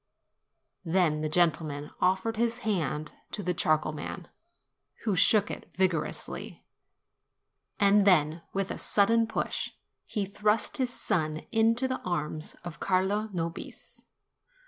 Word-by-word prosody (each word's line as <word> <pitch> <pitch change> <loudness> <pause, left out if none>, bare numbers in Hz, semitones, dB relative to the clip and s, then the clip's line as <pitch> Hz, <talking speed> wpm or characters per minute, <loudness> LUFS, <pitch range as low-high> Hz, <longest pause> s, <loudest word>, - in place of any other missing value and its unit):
Then 165 -3 +2
the 155 - -1
gentleman 155 -3 +1
offered 190 +5 +2
his 235 +1 +1
hand 155 -7 -1 0.2
to 205 - -3
the 180 - 0
char 155 -2 +3
coal 155 0 -4
man, 155 +3 -7 0.7
who 210 -4 +1
shook 210 +3 +5
it - - -8
vigorously, 185 -5 -1 1.1
and 200 0 +5
then, 165 -4 +4
with 195 0 -1
a - - -4
sudden 225 +3 +3
push, 220 - -2 0.3
he 210 -3 -1
thrust 210 +4 +1
his 260 -3 0
son 155 -8 -1
into 230 +3 +3
the 260 - -2
arms 155 -3 -3
of 175 -1 -7
Carlo 200 +3 +1
Nobis. 170 -2 -6
185 Hz, 125 wpm, -29 LUFS, 155-210 Hz, 1.1 s, shook